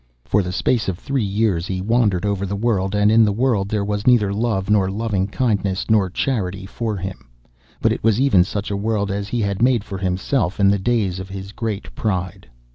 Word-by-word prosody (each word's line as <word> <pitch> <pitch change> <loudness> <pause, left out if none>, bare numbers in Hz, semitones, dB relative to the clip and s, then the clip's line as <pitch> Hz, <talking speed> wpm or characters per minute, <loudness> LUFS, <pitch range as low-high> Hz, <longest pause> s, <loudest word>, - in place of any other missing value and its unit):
For 100 - +2
the 90 -1 -4
space 110 +2 0
of 90 - -3
three 135 +6 -2
years 100 -3 0
he 95 -1 -3
wandered 105 -2 +1
over 100 -1 -1
the 100 - -3
world, 100 -3 0
and 105 +1 +3
in 115 +1 +6
the 105 - +3
world 105 -3 0
there 105 -1 -1
was 105 +1 -3
neither 105 -6 +4
love 105 -3 -1
nor 100 -3 +3
loving 100 -2 -1
kindness 100 -3 -1
nor 100 -4 +3
charity 100 -4 -2
for 110 +1 -3
him, 95 -9 -7 0.5
but - - +4
it - - -3
was 110 0 +3
even 130 -10 +5
such 100 +2 -4
a - - -1
world 100 -1 -1
as 100 0 -3
he 120 +2 -2
had 100 -1 -1
made 125 -3 +3
for 95 -2 -6
himself 95 +3 -1
in 100 -1 +5
the 100 - +1
days 100 -4 0
of 95 +1 -7
his 95 0 -7
great 110 -1 -4
pride. 95 - -3
100 Hz, 215 wpm, -21 LUFS, 95-110 Hz, 0.5 s, in